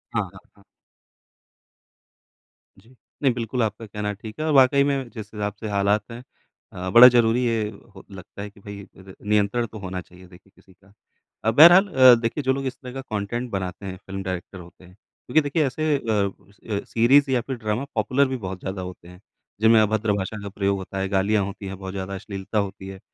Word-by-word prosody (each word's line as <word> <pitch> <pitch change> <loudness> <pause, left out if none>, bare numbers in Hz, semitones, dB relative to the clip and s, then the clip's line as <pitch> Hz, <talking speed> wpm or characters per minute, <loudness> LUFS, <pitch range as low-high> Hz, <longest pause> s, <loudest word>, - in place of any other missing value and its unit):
हाँ, 105 - +2
हाँ, 95 - -13 0.2
हाँ। 100 - -23 2.2
जी। 115 +6 -22 0.3
नहीं 135 -3 +3
बिल्कुल 120 +1 -2
आपका 110 +1 -3
कहना 105 0 -4
ठीक 110 +3 -11
है, 155 - -2
और 160 - 0
वाक़ई 140 +1 +5
में 135 -3 -1
जिस 110 -4 -9
हिसाब 105 -1 -3
से 110 - -5
हालात 105 +2 0
हैं 120 +2 -9 0.5
अ, 90 +1 -5
बड़ा 120 +6 +10
ज़रूरी 120 0 +3
है 115 -3 0 0.2
हो 95 -1 -14
लगता 95 +1 -11
है 105 - -6
कि 100 - -21
भई 100 0 -9 0.2
र 95 0 -13
नियंत्रण 105 +3 +1
तो 110 - -11
होना 95 -1 -5
चाहिए 90 +2 -17
देखिए 90 +2 -19
किसी 95 - -22
का। 95 +2 -25 0.5
अ, 110 - +2
बहरहाल 175 - +8
अ, 130 -8 +7
देखिए 120 +6 -2
जो 130 0 +2
लोग 135 0 -4
इस 130 - -4
तरह 125 -2 -10
का 135 - -5
कॉन्टेंट 120 +1 -4
बनाते 95 0 -5
हैं 95 -1 -5
फ़िल्म 95 0 -7
डायरेक्टर 95 0 -6
होते 90 +1 -15
हैं 90 - -17
क्योंकि 125 +7 -2
देखिए 145 +1 0
ऐसे 155 +3 0
अ - - -9
अ 100 0 -3
सीरीज़ 135 +5 +3
या 125 -2 +2
फिर 130 +3 -5
ड्रामा 110 +3 -2
पॉपुलर 130 +6 +2
भी - - -2
बहुत 95 0 -6
ज़्यादा 95 0 -5
होते 90 -1 -9
हैं 90 0 -14 0.4
जिनमें 110 0 +6
अभद्र 110 0 +1
भाषा 100 +2 -4
का 100 - -6
प्रयोग 100 0 -1
होता 95 0 -7
है, 95 - -1
गालियाँ 100 +1 +1
होती 100 +1 -8
है, 95 - -6
बहुत 95 0 -8
ज़्यादा 95 0 -5
अश्लीलता 95 +1 -6
होती 95 -1 -5
है। 95 0 -9
105 Hz, 210 wpm, -23 LUFS, 95-125 Hz, 2.2 s, बड़ा